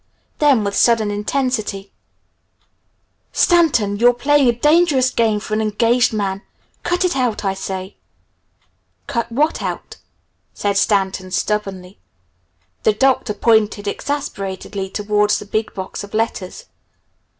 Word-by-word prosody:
Then 280 -7 +4
with 200 0 -2
sudden 225 -3 +3
intensity, 210 -2 -2 1.4
"Stanton, 275 - +3
you're 245 +1 +5
playing 280 +2 +3
a - - +6
dangerous 295 0 +3
game 220 -2 +1
for 215 - -6
an 215 - +1
engaged 230 +4 +2
man. 200 -3 -2 0.4
Cut 360 +1 0
it 355 - 0
out, 245 -6 -1
I 195 - +1
say!" 190 0 -6 1.1
"Cut 235 -4 -3
what 300 +7 0
out?" - - -5 0.6
said 200 -1 -1
Stanton 190 -2 +1
stubbornly. 195 -1 -3 0.8
The 215 - +3
Doctor 250 -2 +1
pointed 215 -2 +2
exasperatedly 200 -7 -4
towards 210 +1 +1
the - - -8
big 215 +2 -2
box 190 +1 -6
of 200 +1 -9
letters. 215 -4 -3
215 Hz, 120 wpm, -19 LUFS, 200-250 Hz, 1.4 s, a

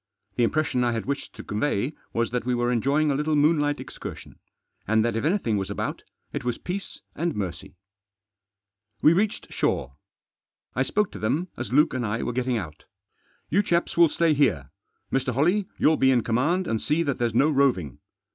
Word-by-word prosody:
The 120 - +2
impression 125 0 +1
I 120 -1 +1
had 115 - -3
wished 140 +1 -4
to - - -8
convey 120 +4 -1 0.2
was 115 0 -1
that 125 0 -1
we 125 0 0
were 120 0 +1
enjoying 140 +5 +2
a - - +2
little 150 +2 0
moonlight 145 -1 +2
excursion, - - -9 0.5
and 110 +1 +3
that 120 - 0
if 115 - -1
anything 155 - +1
was 95 -1 -3
about, - - -3 0.3
it - - -3
was 120 -1 -1
peace 190 +2 -6
and 170 +2 -1
mercy. 95 -2 -5 1.3
We 155 - +7
reached 205 +4 -1
shore. - - -1 0.8
I 130 - +1
spoke 205 +9 +1
to - - -8
them 150 +12 -1
as 120 - -5
Luke 150 +5 +4
and 130 -1 -1
I 115 +1 -2
were 120 - -2
getting 125 0 0
out. 80 -8 -7 0.3
" - - -39
You 195 +7 +4
chaps 170 -3 0
will 170 -1 +6
stay 165 0 +2
here. 100 - +1 0.4
Mr. 130 -1 0
Holley, 180 +8 +2
you'll 155 0 +4
be 130 - +4
in 125 -3 +3
command 150 +11 +1
and 115 -7 -1
see 155 +3 +1
that 140 -4 -2
there's 120 -2 0
no 150 +6 +4
roving. 125 - +1
130 Hz, 195 wpm, -25 LUFS, 115-155 Hz, 1.3 s, We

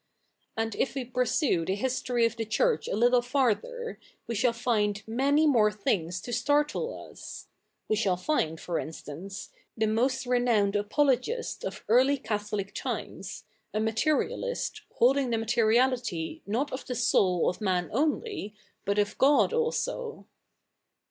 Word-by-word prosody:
And 225 0 -1
if 270 - 0
we 265 -2 -2
pursue 250 - +1
the 190 +4 -1
history 245 +1 0
of 230 - 0
the 230 - -2
Church 460 - +1
a - - -1
little 245 +3 +4
farther, 280 - -1 0.3
we 235 - -3
shall 235 +3 +2
find 225 -3 +1
77ia7iy 280 +6 +3
77iore 210 -3 +3
thi7igs 180 -3 -1
to 240 - -5
startle 290 - 0
us. - - -9 0.4
We 215 - +2
shall 195 -4 +1
fi7id, 165 - 0
for 175 - -2
insta7ice, 165 +5 -8 0.3
the 220 - +2
77iost 245 +4 +1
re7iow7ied 210 -5 +2
apologist 265 - 0
of - - -6
early 260 +5 +4
Catholic 210 -4 -3
ti77ies, - - -5 0.3
a - - +2
77iaterialist, 305 - -1 0.2
holdifig 265 +2 +4
the 230 - +1
7nateriality 235 - +1
7iot 245 +8 -1
of 260 - -4
the 250 - -3
soul 180 -6 +3
of 180 - -1
ma7i 185 -4 0
only, 300 - -1 0.3
but 200 0 0
of 205 0 +1
God 285 - +4
also. 470 0 -2
235 Hz, 140 wpm, -28 LUFS, 210-275 Hz, 0.4 s, little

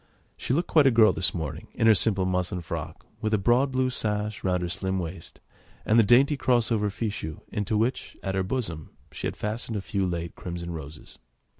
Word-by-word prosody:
She - - -4
looked 165 +6 +1
quite 150 -4 +5
a - - +8
girl 115 -3 +5
this 90 - +1
morning 80 -5 -5
in - - +1
her 110 - +8
simple 100 -2 +3
muslin 90 0 -1
frock, - - -6 0.2
with 110 -1 +1
a - - +2
broad 120 +7 +2
blue 130 0 +1
sash 105 -3 -2
round 90 -1 0
her - - -1
slim 95 +2 -2
waist, 85 -1 -6 0.5
and 110 +2 +4
the - - +7
dainty 130 +7 +5
cross 125 -4 +2
over 105 -2 +1
fichu 100 -7 -4
into 105 +1 -1
which, 115 +4 -1
at 95 - -2
her 95 - +1
bosom, 95 - -3 0.2
she - - -4
had - - -6
fastened 110 +1 -3
a - - -3
few 95 -2 -1
late 85 -1 -4
crimson 85 -1 -6
roses. 75 -2 -9
105 Hz, 205 wpm, -26 LUFS, 90-115 Hz, 0.5 s, a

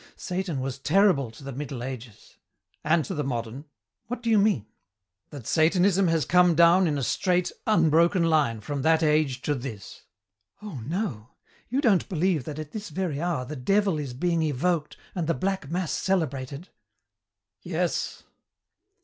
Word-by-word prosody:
Satan 180 -6 -3
was 135 0 -4
terrible 155 - +3
to 115 +5 -14
the 140 - -6
Middle 135 -2 -5
Ages 125 -4 -9 0.2
" - - -45
"And 155 +1 +2
to - - -4
the 150 -4 -2
modern." 120 +1 -4 0.4
"What 245 +1 -5
do 230 - +1
you 215 - +5
mean?" 200 - +2 0.6
That 140 -6 -9
Satanism 180 +7 +3
has 165 -2 +1
come 180 -1 +4
down 170 +3 +6
in 150 -2 0
a 140 - -2
straight, 180 +7 +1 0.2
unbroken 170 -2 +4
line 150 -9 +2
from 140 +5 -4
that 160 +2 +3
age 150 -4 +1
to 150 - +1
this." 120 -7 -7 0.6
"Oh, 200 - -7
no; 150 - -3 0.4
you 260 +4 0
don't 210 - +2
believe 175 -5 0
that 150 -1 -6
at 155 -1 -7
this 210 -1 -6
very 175 -6 -3
hour 170 -7 -1
the 150 +4 -6
devil 195 +5 +1
is 135 -4 -5
being 170 +4 0
evoked 155 +2 -1 0.2
and 170 -4 -2
the 165 - +1
black 190 -6 -2
mass 175 0 -2
celebrated?" 145 -4 -2 0.9
"Yes." - - -2
160 Hz, 165 wpm, -26 LUFS, 140-180 Hz, 0.9 s, down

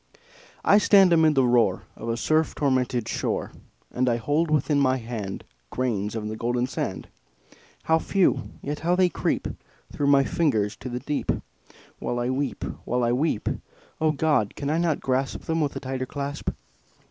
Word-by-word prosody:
I 205 - +6
stand 195 -4 +6
amid 160 -2 +4
the 135 -1 +4
roar 120 -1 +3
Of 115 - -6
a 115 - 0
surf 155 +5 +1
tormented 130 -4 0
shore, - - -2 0.4
And 125 0 +1
I 120 - +2
hold 150 +7 0
within 150 -1 +2
my 130 -1 +3
hand 115 -5 -5 0.3
Grains 110 - -2
of 110 -1 -3
the 110 - -4
golden 120 +2 0
sand 130 - -4 0.8
How 160 0 +3
few! 195 +2 +1
yet 145 +2 -3
how 175 +2 +1
they 185 -1 +4
creep - - -1 0.5
Through 145 - 0
my 140 -1 +6
fingers 110 -10 +1
to 130 - -7
the 125 0 -4
deep, 145 +2 -1 0.7
While 120 - -2
I 120 +1 0
weep 135 +1 -2 0.2
while 125 +1 0
I 120 - +2
weep! 130 -2 0 0.5
O 155 -1 +4
God! 150 -8 +1
can 140 0 -2
I 160 - +1
not 170 -4 +1
grasp 130 0 -1
Them 165 0 -1
with 145 -2 -1
a - - -3
tighter 130 0 -4
clasp? 140 +1 -4
135 Hz, 175 wpm, -25 LUFS, 120-155 Hz, 0.8 s, I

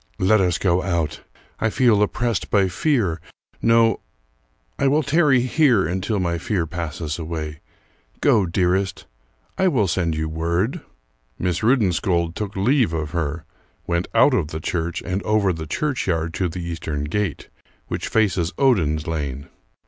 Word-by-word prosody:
"Let 95 +3 +3
us 90 -3 +1
go 90 -1 +1
out! 85 -5 -2 0.4
I 110 - +1
feel 115 -3 +3
oppressed 115 +1 -1
by 100 -2 +3
fear 95 - 0 0.4
no, 115 -2 +4 0.8
I 140 - +3
will 150 +3 +3
tarry 140 -2 +3
here 125 - +3
until 95 +5 -1
my 85 -2 -1
fear 90 -1 -1
passes 80 -1 -4
away. 80 -2 -5 0.6
Go, 100 -4 +3
dearest, 90 +2 0 0.5
I 190 - +4
will 125 - +2
send 85 -2 0
you 80 0 -2
word." 85 - -1 0.6
Miss 90 +2 -1
Rudensköld 95 -7 +2
took 105 +1 -5
leave 115 - +2
of 80 -2 -3
her; 80 -1 -3 0.4
went 85 +1 -1
out 145 - +5
of 95 -11 +1
the 80 0 -5
church 85 +1 -3
and 95 +1 -2
over 105 -3 +2
the 80 -1 -6
churchyard 90 - -1
to 90 0 -1
the 90 +1 -6
Eastern 80 -3 -4
Gate, 95 +3 -3 0.4
which - - -3
faces 95 -6 +1
Oden's 80 - +2
lane.... 70 -4 -4
90 Hz, 150 wpm, -22 LUFS, 80-110 Hz, 0.8 s, out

